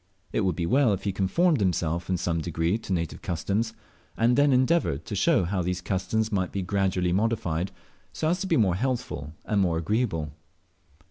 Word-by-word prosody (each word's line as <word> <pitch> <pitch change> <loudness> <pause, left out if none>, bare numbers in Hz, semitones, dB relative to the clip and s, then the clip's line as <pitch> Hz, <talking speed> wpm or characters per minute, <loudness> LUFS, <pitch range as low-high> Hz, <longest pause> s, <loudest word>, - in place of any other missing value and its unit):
It - - +1
would 95 -3 +1
be 85 - -1
well 125 +2 +3
if 100 0 -4
he 100 - 0
conformed 135 - +2
himself 85 -3 0
in 90 - +1
some 85 -1 -1
degree 85 +5 0
to 105 - -8
native 85 -3 -2
customs, 105 +7 -2 0.4
and 120 +2 +3
then 145 +1 +4
endeavoured 130 - +2
to - - -4
show - - +3
how 90 +2 -1
these 90 +1 -1
customs 105 +4 -1
might 95 -3 0
be 95 - -2
gradually 95 -2 0
modified, 95 -4 0 0.4
so 155 - -2
as 180 +2 +1
to 190 - -2
be 165 - +2
more 100 -7 +3
healthful 100 - -3
and 105 -2 +1
more 85 -3 +1
agreeable. 85 - -1
95 Hz, 190 wpm, -26 LUFS, 85-115 Hz, 0.4 s, then